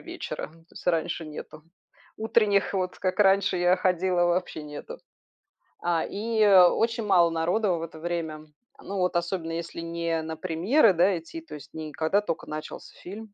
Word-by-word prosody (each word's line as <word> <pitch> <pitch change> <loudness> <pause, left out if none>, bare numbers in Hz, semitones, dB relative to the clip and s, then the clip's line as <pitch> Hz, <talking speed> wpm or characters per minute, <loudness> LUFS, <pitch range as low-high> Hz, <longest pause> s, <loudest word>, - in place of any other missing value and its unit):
вечера, - - -6
то 165 +1 -21
есть - - -12
раньше 165 0 0
нету. 155 0 -9 0.5
Утренних 210 -3 +2
вот, 185 -1 -2
как 185 +2 -1
раньше 195 -1 +4
я 175 +1 +4
ходила, 180 -1 +1
вообще 175 -3 -1
нету. 310 - -8 0.8
А, 170 -2 +1
и 220 +1 0
очень 210 +4 +5
мало 180 -4 +5
народу 175 +4 +1
в 165 - -4
это 160 -1 -8
время, 160 -2 -4 0.3
ну 200 - -5
вот 180 -1 0
особенно, 170 -1 -2
если 170 0 -5
не 165 -1 -2
на 160 0 -5
премьеры, 185 - +3
да, 180 +2 +3
идти, 165 - -8
то 325 - -13
есть 145 -1 -12
не 155 -1 -7
когда 160 +7 +1
только 170 -6 -4
начался 155 0 -7
фильм. 210 +3 -9
175 Hz, 165 wpm, -26 LUFS, 165-195 Hz, 0.8 s, очень